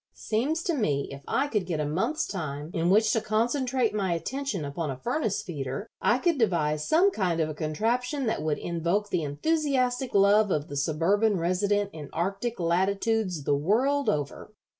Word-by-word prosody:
Seems 285 +10 -1
to 345 - 0
me 150 - 0
if 140 0 -9
I 280 - +1
could 210 -9 -1
get 165 -4 -2
a 150 - 0
month's 185 - 0
time 155 -4 -5
in 170 0 +1
which 215 +3 +4
to 225 - +1
concentrate 245 +2 0
my 195 -4 0
attention 230 - -3
upon 145 +2 -3
a 135 - -4
furnace 220 - -1
feeder, 145 - -5
I 240 - +3
could 330 +1 +1
devise 155 -8 +1
some 365 +5 +4
kind 180 - 0
of 155 -1 +1
a - - -4
contraption 235 - -1
that 220 -9 -1
would 155 -1 0
invoke 175 +5 -1
the 170 - +1
enthusiastic 255 - 0
love 200 +2 +5
of 150 -4 -1
the 145 - -6
suburban 185 +9 +2
resident 200 +4 0
in 150 -3 -8
Arctic 195 +7 -2
latitudes 190 +1 0
the 145 - +1
world 250 - +1
over." 145 +7 -3
200 Hz, 180 wpm, -27 LUFS, 155-240 Hz, -, love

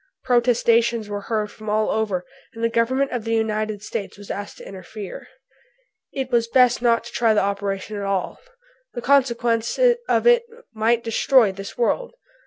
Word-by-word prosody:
Protestations 235 -2 +2
were 205 0 -4
heard 215 -2 -1
from 215 -1 -9
all 215 +1 +1
over, 200 -5 -1 0.3
and 230 - -6
the 230 - +3
Government 260 +4 +1
of 245 -3 -3
the 225 0 -1
United 215 -1 -1
States 200 -2 -5
was 205 0 -9
asked 205 0 -6
to - - -11
interfere. 195 +2 -9 0.8
"It 265 -1 -4
was 235 -1 +2
best 245 -1 +4
not 235 -2 +2
to 235 - -10
try 225 -2 +2
the 210 - +3
operation 200 +1 -3
at 200 - -4
all." 195 -2 -2 0.6
"The 240 - -5
consequences 255 - +2
of - - +2
it 480 0 +6 0.3
might 225 +2 +1
destroy 230 -1 +3
this 195 +1 -9
world." 485 - -1
225 Hz, 170 wpm, -22 LUFS, 210-240 Hz, 0.8 s, it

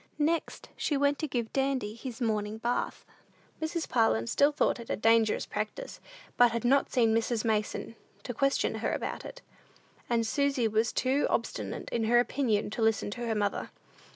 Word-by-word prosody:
Next, 315 +2 -1
she 290 - 0
went 285 +1 +2
to 310 - -1
give 240 -4 -3
Dandy 265 -6 0
his 240 +2 -8
morning 215 -2 -1
bath. 240 +2 -2 0.6
Mrs. 320 +1 -2
Parlin 115 - +2
still 285 - +3
thought 290 - +1
it 235 - -9
a - - 0
dangerous 225 0 +3
practice, 220 - -5 0.4
but 245 0 +7
had 235 0 -3
not 275 +3 +3
seen 230 -4 +3
Mrs. 230 0 0
Mason, 215 0 -1 0.3
to 245 - -4
question 275 +4 +1
her - - 0
about - - -4
it, - - -10 0.7
and 230 -1 +2
Susy 275 0 +1
was 220 +2 +1
too 265 +3 +1
obstinate - - -2
in 230 -2 0
her 240 +2 +5
opinion 240 -5 0
to 225 - -4
listen 220 -2 +1
to 240 +2 -4
her 225 - 0
mother. 205 -1 -1
235 Hz, 175 wpm, -29 LUFS, 220-275 Hz, 0.7 s, but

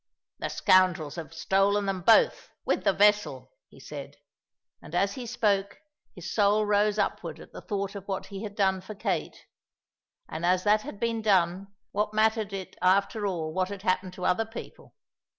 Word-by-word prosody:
"The - - -3
scoundrels 180 -5 +3
have 165 -1 -7
stolen 195 +4 +1
them 195 -2 -2
both, 230 - +4 0.2
with - - 0
the - - +5
vessel," 205 -11 +2 0.2
he - - -17
said; 140 -1 -9 0.7
and 160 - -9
as 195 +2 +1
he 250 -2 -7
spoke 200 -3 0 0.4
his 175 -2 -7
soul 210 0 +3
rose 210 0 +2
upward 200 - -2
at - - -13
the - - -8
thought 200 -2 -3
of 200 -2 -9
what 195 -2 -3
he 195 -1 -8
had 210 -2 -7
done 190 -2 +1
for 215 - -9
Kate; 200 - -3 0.8
and 160 - -6
as 180 +1 +2
that 210 +1 +3
had 205 - -9
been 230 -1 -1
done, 190 -2 +2 0.2
what 210 +1 -1
mattered 220 -1 +2
it 195 -1 -6
after 200 +3 +2
all 160 -4 -3
what 185 +1 0
had 200 -1 -7
happened 185 -2 0
to 180 0 -6
other 180 +5 +2
people? 225 +1 -11
195 Hz, 180 wpm, -27 LUFS, 185-210 Hz, 0.8 s, the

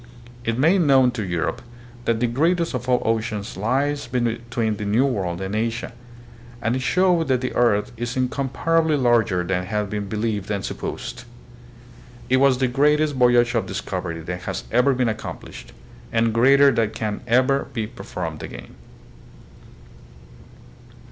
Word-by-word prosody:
It 115 -1 -1
made 165 +8 +4
known 135 -5 +5
to 120 -3 -4
Europe 85 -3 -2 0.4
that 115 -1 +1
the 120 - +2
greatest 165 +8 +1
of 125 0 -4
all 125 - +2
oceans 110 -2 -2
lies 135 +7 -1
between 120 -2 -1
the 105 - -5
New 110 +6 +2
World 95 -10 -2
and 95 +2 -3
Asia, 115 +2 -2 0.7
and 120 +1 0
it 130 - -2
showed 175 +3 +2
that 130 -2 +1
the 130 - -3
earth 105 -4 +2
is 120 +2 -4
in 130 0 +2
comparably 155 +4 0
larger 115 -8 +2
than 90 +1 -2
had 105 0 -2
been 105 -1 -3
believed 105 -2 -2
and 100 -2 -2
supposed. 125 - -6 1.0
It 130 - +4
was 135 -1 +4
the 130 0 +1
greatest 150 +4 +2
voyage 120 -2 +4
of 115 - 0
discovery 90 -4 -4
that 90 +2 -5
has - - -3
ever 125 +3 +3
been 125 -1 +1
accomplished, 110 -1 -6 0.4
and 115 -1 +1
greater 140 +4 +6
than 115 -4 +1
can 105 -1 -4
ever 130 +4 +2
be 115 -3 -2
per - - -11
formed - - -5
again. - - -9
120 Hz, 155 wpm, -22 LUFS, 105-130 Hz, 1.0 s, greater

